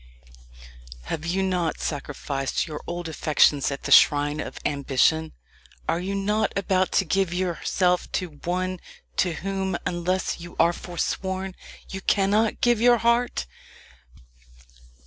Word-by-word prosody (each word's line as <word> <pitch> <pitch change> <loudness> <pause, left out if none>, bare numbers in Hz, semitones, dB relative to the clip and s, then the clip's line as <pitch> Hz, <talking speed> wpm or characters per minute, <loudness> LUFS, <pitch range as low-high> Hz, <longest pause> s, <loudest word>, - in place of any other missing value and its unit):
Have 160 - -4
you 190 +3 0
not 180 -3 -1
sacrificed 140 -2 -3
your 155 -2 -7
old 175 0 -4
affections 150 -2 +3
at 140 -1 -5
the - - -4
shrine 145 +1 +5
of - - -5
ambition? 145 +3 +1 0.5
Are 165 - +1
you 190 +2 -3
not 210 +2 0
about 190 -1 +1
to 195 - +3
give 190 +1 +1
yourself 180 0 0
to 160 -6 -3
one 185 +1 -1 0.4
to 180 -3 +2
whom 190 +2 -2
unless 180 +2 -1
you 170 +1 -10
are 170 +1 +5
foresworn 190 +2 -3 0.3
you 190 - -6
cannot 205 +3 +2
give 240 -2 +3
your 240 0 +6
heart? 235 - +1
180 Hz, 125 wpm, -25 LUFS, 160-195 Hz, 0.5 s, your